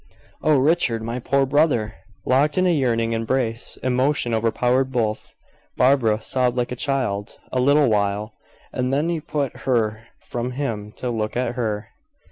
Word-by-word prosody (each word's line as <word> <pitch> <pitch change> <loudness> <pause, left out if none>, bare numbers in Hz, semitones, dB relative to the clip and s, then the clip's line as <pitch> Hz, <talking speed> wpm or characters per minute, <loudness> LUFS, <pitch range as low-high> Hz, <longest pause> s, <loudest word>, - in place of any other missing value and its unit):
"Oh, 155 -2 +4
Richard! 130 -5 +2
My 115 +2 -3
poor 135 +2 +2
brother!" 135 -6 +2 0.3
Locked 145 +5 +2
in 185 - +3
a 180 - +4
yearning 115 -6 +1
embrace, 115 0 -1
emotion 130 -1 +1
overpowered 125 +4 +1
both. 110 -4 -2 0.4
Barbara 125 -5 +3
sobbed 125 0 0
like 125 0 -1
a - - -2
child. 120 -6 -2
A 130 - 0
little 140 +2 +4
while, 105 0 0 0.4
and 125 0 -1
then 145 +5 +1
he 170 -2 -1
put 145 -4 -3
her 110 -3 -1
from 120 +1 -4
him, 115 -6 -3
to 125 - -4
look 110 0 -2
at 125 -1 0
her. 110 -3 -3
125 Hz, 155 wpm, -22 LUFS, 115-135 Hz, 0.4 s, Oh